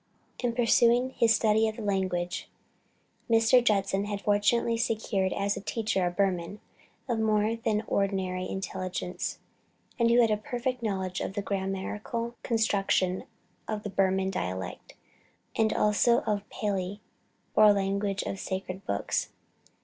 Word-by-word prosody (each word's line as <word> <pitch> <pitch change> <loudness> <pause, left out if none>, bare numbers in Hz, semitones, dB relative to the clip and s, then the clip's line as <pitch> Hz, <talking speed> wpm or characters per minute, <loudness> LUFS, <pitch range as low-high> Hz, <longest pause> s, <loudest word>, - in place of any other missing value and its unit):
In 245 -2 0
pursuing 240 +1 +4
his 230 -3 +3
study 220 0 +3
of 220 - -3
the 225 - -7
language, 185 -3 -1 0.8
Mr. 230 +2 +5
Judson 195 -3 +1
had 205 -1 -3
fortunately 210 +3 +2
secured 220 -4 0
as 200 +1 0
a - - -5
teacher 210 -4 0
a - - +1
Burman 185 +1 -1 0.5
of 235 -3 0
more 215 0 +2
than 220 -2 0
ordinary 190 -2 -1
intelligence, 185 -1 -4 0.6
and 235 0 +4
who 235 +1 +5
had 230 -2 +4
a 210 - +2
perfect 245 +3 -3
knowledge 190 -4 -2
of - - -3
the 205 0 -3
grammatical 200 +4 -3
construction 195 -5 +1 0.4
of 215 -1 -3
the 205 - -5
Burman 190 0 +1
dialect, 95 - -5 0.6
and 220 -1 +2
also 215 +3 +3
of 210 -2 0
the 200 - -25
Pali, 200 -1 -2 0.6
or 215 -1 +8
language 200 0 0
of - - -3
the - - -8
sacred 190 0 -5
books. 100 - -1
205 Hz, 140 wpm, -28 LUFS, 190-225 Hz, 0.8 s, or